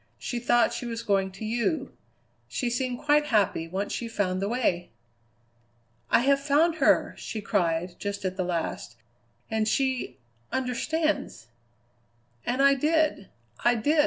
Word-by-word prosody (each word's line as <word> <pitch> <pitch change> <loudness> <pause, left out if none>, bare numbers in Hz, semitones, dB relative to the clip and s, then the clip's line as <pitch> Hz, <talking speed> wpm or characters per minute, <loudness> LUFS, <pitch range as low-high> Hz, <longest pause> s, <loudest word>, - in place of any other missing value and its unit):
She 240 - -4
thought 240 -1 +3
she 245 - -4
was 230 0 -4
going 195 -2 +1
to 195 +3 -7
you. 240 - -1 0.6
She 245 -2 -2
seemed 250 0 -1
quite 295 0 +3
happy 205 - +1
once 190 +4 -3
she 235 - -3
found 190 -4 -1
the 200 - -1
way! 220 -8 0 1.2
"'I - - +5
have 275 +2 +3
found 300 +4 +2
her!' 280 - +3
she 220 - -5
cried 175 -4 -1
just 200 -1 -4
at 185 0 -1
the 185 - -1
last, 175 -2 -3 0.6
'and 220 -1 +1
she 260 - 0 0.3
understands!'" 260 - -1 1.0
"And 255 +3 +2
I 275 0 +7
did, 305 -6 +1 0.3
I 240 0 +4
did!" 295 +8 +2
235 Hz, 145 wpm, -27 LUFS, 195-275 Hz, 1.2 s, I